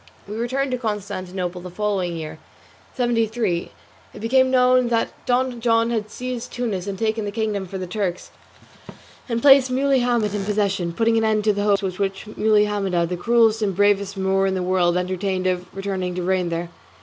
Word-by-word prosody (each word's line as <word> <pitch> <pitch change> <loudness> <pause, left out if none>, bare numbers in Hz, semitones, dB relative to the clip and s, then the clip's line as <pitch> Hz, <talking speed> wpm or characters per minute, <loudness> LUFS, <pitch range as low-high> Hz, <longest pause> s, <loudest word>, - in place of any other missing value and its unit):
We 210 - -6
returned 260 +4 -1
to 250 - -1
Constantinople, 185 -5 -4
and 175 - -12
the 180 - -13
following 190 -5 -1
year, 155 0 -7 0.6
seventy 240 -3 +2
three, 215 -6 -2 0.5
it - - -8
became 260 +4 +3
known 255 -1 +4
that 230 -1 +1 0.2
Don 250 -1 0
John 230 0 +2
had 215 -2 -2
seized 250 +1 -5
Tunis 210 -6 -3
and 195 -1 -4
taken 220 +1 -1
the 205 - -3
kingdom 210 -3 -2
from 190 +1 -6
the - - -3
Turks, 180 -1 -3 1.0
and 230 -1 -1
placed 270 -2 +7
Muley 270 +1 +2
Hamet 240 -4 +1
in 205 -1 -2
possession, 195 -4 0
putting 225 +5 +2
an - - 0
end 215 -1 +2
to 210 0 +3
the 205 - -2
hopes 205 -1 +2 0.2
which 195 0 -2
Muley 215 -1 +3
Hamida, 195 -4 0
the 180 - -3
cruelest 225 +3 +3
and 200 -3 0
bravest 200 0 +2
Moor 195 0 +1
in 190 - 0
the 185 - -1
world, 180 -1 +2
entertained 185 +1 -2
of 180 -1 -1
returning 190 -2 -3
to 180 - -3
reign 180 -1 0
there. 170 +1 -4
205 Hz, 195 wpm, -22 LUFS, 185-230 Hz, 1.0 s, placed